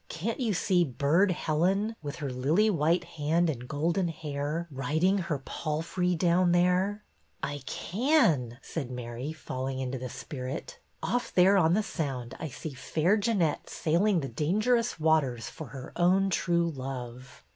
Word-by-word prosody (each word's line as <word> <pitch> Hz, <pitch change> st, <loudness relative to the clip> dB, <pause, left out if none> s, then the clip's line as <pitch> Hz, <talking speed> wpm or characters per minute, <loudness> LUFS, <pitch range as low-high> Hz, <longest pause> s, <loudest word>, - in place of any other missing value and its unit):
" -, -, -39 dB
Can't 210 Hz, -, -3 dB
you 240 Hz, -4 st, +1 dB
see 180 Hz, +1 st, +3 dB
Burd 155 Hz, +7 st, +2 dB
Helen, 185 Hz, +6 st, +1 dB
with 145 Hz, 0 st, -5 dB
her 145 Hz, -5 st, -4 dB
lily 155 Hz, +13 st, +2 dB
white 170 Hz, 0 st, +2 dB
hand 165 Hz, 0 st, +1 dB
and 125 Hz, -3 st, -7 dB
golden 165 Hz, +6 st, 0 dB
hair, 155 Hz, +1 st, -3 dB
riding 160 Hz, +9 st, +1 dB
her 170 Hz, -5 st, -1 dB
palfrey 170 Hz, +6 st, -2 dB
down 175 Hz, +1 st, +3 dB
there? 180 Hz, +4 st, +2 dB, 0.2 s
" -, -, -39 dB
'T 145 Hz, 0 st, -5 dB
can," 175 Hz, -, +2 dB
said 140 Hz, -7 st, -4 dB
Mary, 125 Hz, +3 st, -5 dB
falling 130 Hz, -4 st, -4 dB
into 130 Hz, 0 st, -3 dB
the 130 Hz, 0 st, -5 dB
spirit. 130 Hz, -, -6 dB, 0.2 s
Off 245 Hz, 0 st, -1 dB
there 190 Hz, +2 st, +5 dB
on 170 Hz, -2 st, +4 dB
the 215 Hz, -, +2 dB
Sound 135 Hz, -10 st, -4 dB
I 160 Hz, -, -3 dB
see 150 Hz, +2 st, -7 dB
Fair 160 Hz, +8 st, +1 dB
Jeannette 200 Hz, -8 st, 0 dB
sailing 175 Hz, +3 st, +2 dB
the 135 Hz, -, -3 dB
dangerous 215 Hz, -, +1 dB
waters 145 Hz, -8 st, +2 dB
for 160 Hz, -, -8 dB
her 130 Hz, 0 st, -9 dB
own 190 Hz, +3 st, +3 dB
true 170 Hz, -2 st, +1 dB
love." 130 Hz, -, -7 dB
160 Hz, 155 wpm, -29 LUFS, 135-185 Hz, 0.2 s, there